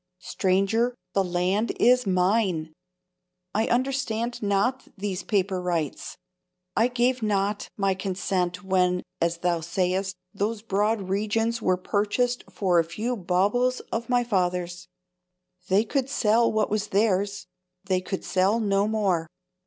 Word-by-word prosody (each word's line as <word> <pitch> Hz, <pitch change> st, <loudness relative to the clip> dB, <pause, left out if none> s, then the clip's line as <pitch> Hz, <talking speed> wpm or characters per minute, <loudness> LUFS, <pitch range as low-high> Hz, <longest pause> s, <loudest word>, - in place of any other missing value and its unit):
Stranger, 195 Hz, +6 st, +1 dB, 0.2 s
the 195 Hz, -, +3 dB
land 180 Hz, +5 st, 0 dB
is 250 Hz, -1 st, +4 dB
mine! 180 Hz, -4 st, +1 dB, 0.8 s
I 220 Hz, +2 st, +1 dB
understand 240 Hz, -2 st, -1 dB
not 210 Hz, +6 st, 0 dB
these 195 Hz, -1 st, -3 dB
paper 195 Hz, -3 st, 0 dB
rights; 170 Hz, -5 st, -3 dB, 0.6 s
I 225 Hz, -, +4 dB
gave 250 Hz, 0 st, +1 dB
not 205 Hz, -1 st, 0 dB
my 195 Hz, -2 st, +2 dB
consent 185 Hz, -1 st, -2 dB
when, 180 Hz, -1 st, +1 dB, 0.2 s
as 170 Hz, 0 st, +1 dB
thou 170 Hz, 0 st, 0 dB
sayest, 185 Hz, +3 st, -1 dB, 0.2 s
those 210 Hz, +2 st, -2 dB
broad 210 Hz, +1 st, +1 dB
regions 215 Hz, +4 st, 0 dB
were 185 Hz, -3 st, +2 dB
purchased 215 Hz, +6 st, 0 dB
for 180 Hz, -4 st, +2 dB
a -, -, +4 dB
few 220 Hz, +9 st, -3 dB
baubles 205 Hz, +7 st, +1 dB
of 230 Hz, +1 st, -3 dB
my 245 Hz, -1 st, +3 dB
fathers. 180 Hz, -5 st, -1 dB, 0.8 s
They 195 Hz, +3 st, +4 dB
could 265 Hz, +3 st, -1 dB
sell 230 Hz, -2 st, +3 dB
what 215 Hz, -1 st, 0 dB
was 215 Hz, 0 st, 0 dB
theirs; 200 Hz, -1 st, +1 dB, 0.4 s
they 185 Hz, -1 st, +1 dB
could 190 Hz, +1 st, -5 dB
sell 195 Hz, +4 st, +2 dB
no 200 Hz, -2 st, +2 dB
more. 195 Hz, -7 st, 0 dB
200 Hz, 130 wpm, -26 LUFS, 185-225 Hz, 0.8 s, is